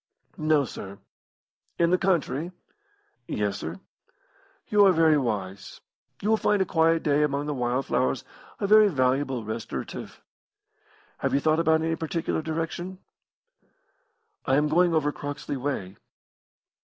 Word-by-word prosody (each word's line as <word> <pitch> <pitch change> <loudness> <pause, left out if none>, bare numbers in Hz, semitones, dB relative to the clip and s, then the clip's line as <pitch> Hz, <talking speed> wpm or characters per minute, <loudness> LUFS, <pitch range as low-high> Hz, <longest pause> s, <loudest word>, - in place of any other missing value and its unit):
"No, 155 -2 +3
sir. 100 -3 -8 0.8
"In 170 0 +3
the 180 - +4
country?" 170 -3 0 0.8
"Yes, - - -2
sir." - - -6 0.9
"You 210 -3 +4
are - - +6
very 160 -3 +4
wise. 100 -8 -3 0.4
You 210 - 0
will 220 - +4
find 210 -1 +2
a 190 - +2
quiet 165 -1 +2
day 145 -1 +2
among 145 -1 0
the 150 - -2
wild 125 0 -1
flowers 65 +1 0 0.4
a - - -1
very 215 +1 +7
valuable 130 - 0
restorative. 110 +1 -6 1.0
Have - - 0
you - - +4
thought 155 +2 +2
of 165 - -1
any 160 +1 +3
particular 160 0 -2
direction?" 165 +3 -4 1.5
"I 135 - +2
am 150 +1 +2
going 175 +1 +3
over 150 -2 +2
Croxley 145 0 -5
way." 125 -8 -4
155 Hz, 135 wpm, -26 LUFS, 135-165 Hz, 1.5 s, very